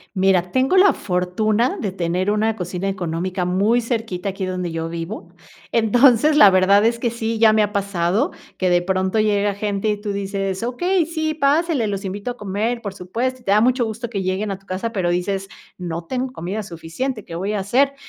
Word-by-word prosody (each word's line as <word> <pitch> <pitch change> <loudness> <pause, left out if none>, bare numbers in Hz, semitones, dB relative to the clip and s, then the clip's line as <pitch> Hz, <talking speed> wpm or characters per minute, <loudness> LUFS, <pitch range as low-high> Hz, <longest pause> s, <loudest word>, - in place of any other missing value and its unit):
Mira, 185 -2 +2
tengo 260 +7 +2
la 380 +1 +6
fortuna 210 +6 0
de 200 - -2
tener 185 +2 -1
una 215 +1 +1
cocina 180 0 -3
económica 180 0 -2
muy 200 +7 +2
cerquita 220 -5 -3
aquí 195 0 -5
donde 180 -2 -3
yo 165 0 -3
vivo. 170 +6 -6 0.4
Entonces, 245 +5 +4
la 295 -9 +9
verdad 190 +2 +4
es 230 +1 +2
que 235 0 -1
sí, 230 -1 -2
ya 220 -1 +5
me 215 - +4
ha 205 -1 +1
pasado 200 -1 0 0.3
que 185 -1 +1
de 175 0 +4
pronto 190 +3 0
llega 205 -1 +2
gente 200 0 -2
y 210 -1 -2
tú 205 -1 -3
dices: 195 0 -3
"Okey, 350 +9 +1
sí, 315 -1 -2
pásele. 295 -2 +2
Los 200 -1 -3
invito 200 +5 -4
a 245 - -9
comer, 210 +4 -2
por 200 -3 -6
supuesto", 240 +8 -3
y - - -21
te 200 - -1
da 210 +1 +5
mucho 250 +1 +2
gusto 225 +2 -5
que 200 -4 -3
lleguen 190 +3 -1
a 195 - -3
tu 195 - -26
casa, 195 +5 -3
pero 185 -5 0
dices: 195 +2 -1 0.3
"No 170 -2 -5
tengo 255 +5 -3
comida 200 +2 -4
suficiente, 200 +7 -5
¿qué 165 - -9
voy 195 +5 -2
a 210 - -1
hacer?". 260 +8 +2
205 Hz, 205 wpm, -21 LUFS, 185-235 Hz, 0.4 s, la